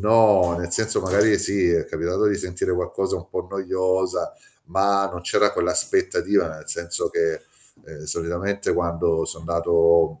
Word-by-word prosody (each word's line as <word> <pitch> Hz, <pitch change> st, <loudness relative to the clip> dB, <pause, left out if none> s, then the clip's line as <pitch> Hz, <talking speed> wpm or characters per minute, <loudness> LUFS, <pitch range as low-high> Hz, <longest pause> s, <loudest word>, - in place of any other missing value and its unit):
no, 105 Hz, -5 st, +4 dB
nel 85 Hz, 0 st, -5 dB
senso 110 Hz, +4 st, +1 dB
magari, 100 Hz, +3 st, +3 dB
sì, 95 Hz, -3 st, +1 dB
è 85 Hz, -, +1 dB
capitato 90 Hz, +5 st, -1 dB
di 105 Hz, -1 st, +2 dB
sentire 90 Hz, 0 st, -3 dB
qualcosa 95 Hz, +2 st, -2 dB
un 90 Hz, +2 st, -10 dB
po' 90 Hz, -, -4 dB
noiosa 95 Hz, -1 st, -1 dB, 0.4 s
ma 100 Hz, +1 st, +1 dB
non 90 Hz, -2 st, -7 dB
c'era 90 Hz, -, +2 dB
quell'aspettativa 380 Hz, -1 st, +1 dB
nel -, -, -11 dB
senso 460 Hz, -2 st, -2 dB
che, 430 Hz, +2 st, -1 dB, 0.4 s
ehm, 75 Hz, -1 st, -11 dB
solitamente 85 Hz, +6 st, -2 dB
quando 85 Hz, -1 st, 0 dB
so 80 Hz, -, -4 dB
'ndato, 85 Hz, 0 st, +2 dB
95 Hz, 145 wpm, -22 LUFS, 85-100 Hz, 0.4 s, no